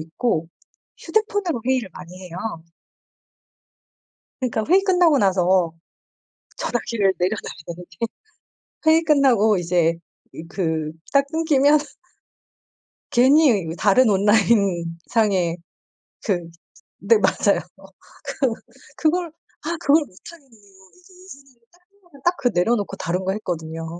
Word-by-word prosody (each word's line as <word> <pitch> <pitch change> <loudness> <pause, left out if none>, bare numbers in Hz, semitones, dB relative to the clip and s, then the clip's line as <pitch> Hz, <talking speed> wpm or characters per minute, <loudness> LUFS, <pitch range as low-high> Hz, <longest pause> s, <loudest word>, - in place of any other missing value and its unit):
있고 165 +1 -2 0.5
휴대폰으로 410 - -1
회의를 255 -6 0
많이 180 +2 -11
해요. 175 -2 -9 2.0
그러니까 230 -4 -1
회의 375 +4 +5
끝나고 355 -6 +3
나서 185 -4 +2 0.9
전화기를 230 - 0
내려 185 +4 +1
달라는 170 +1 -9
게 165 - -18 0.9
회의 325 +1 +5
끝나고 255 -9 +3
이제 170 -1 +1 0.4
이 160 - -8
그 160 -4 -2 0.2
딱 280 0 +4
끊기면 300 -2 +3 1.3
괜히 260 -2 +5
이 165 -1 -5
다른 220 +6 +4
온라인 200 -4 +2
상에 190 -7 +1 0.7
그 - - 0 0.7
네. 215 +3 +4
맞아요. 200 0 +2 0.6
그 270 - -1 0.5
그걸 340 +3 +1 0.4
아 335 +3 -2
그걸 305 0 +3
못하겠는 275 - -16
거 195 -4 -22
이제 365 +1 -21
예전에는 275 -9 -16
딱 355 - -26
끝나면 350 -8 -21
딱 350 +1 +2
그 265 - 0
내려놓고 200 +2 0
다른 180 +2 -3
거 190 - 0
했거든요. 165 -4 -5
220 Hz, 245 characters per minute, -22 LUFS, 180-290 Hz, 2.0 s, 회의